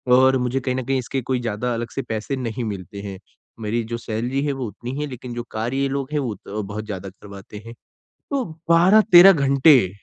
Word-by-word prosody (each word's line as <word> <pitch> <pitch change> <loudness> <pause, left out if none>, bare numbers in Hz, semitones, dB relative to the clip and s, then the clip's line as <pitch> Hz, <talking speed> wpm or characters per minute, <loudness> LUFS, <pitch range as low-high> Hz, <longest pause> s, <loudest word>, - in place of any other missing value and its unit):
और 130 +1 +5
मुझे 125 +1 -1
कहीं 130 0 -2
ना 130 - -2
कहीं 135 +1 0
इसके 130 +2 -3
कोई 130 +1 -1
ज़्यादा 120 +1 -2
अलग 115 0 -4
से - - -1
पैसे 110 +3 -4
नहीं 125 -1 -4
मिलते 100 -1 -6
हैं। 100 -2 -7 0.4
मेरी 115 +2 -1
जो 115 - -1
सैलरी 120 +5 -3
है 145 - 0
वो 130 -3 -4
उतनी 125 +7 -7
है, 150 - -2
लेकिन 125 -2 -8
जो 120 - -4
कार्य 115 +5 -2
ये 135 0 +1
लोग 135 0 -3
हैं, 150 - +1
वो 120 -6 -3
त 95 - -16
बहुत 105 +2 -6
ज़्यादा 100 -2 -6
करवाते 100 +1 -12
हैं। 115 - -9 0.6
तो 275 -2 0 0.3
12-13 190 +2 +7
घंटे, 140 - +4
125 Hz, 215 wpm, -22 LUFS, 110-135 Hz, 0.6 s, 12-13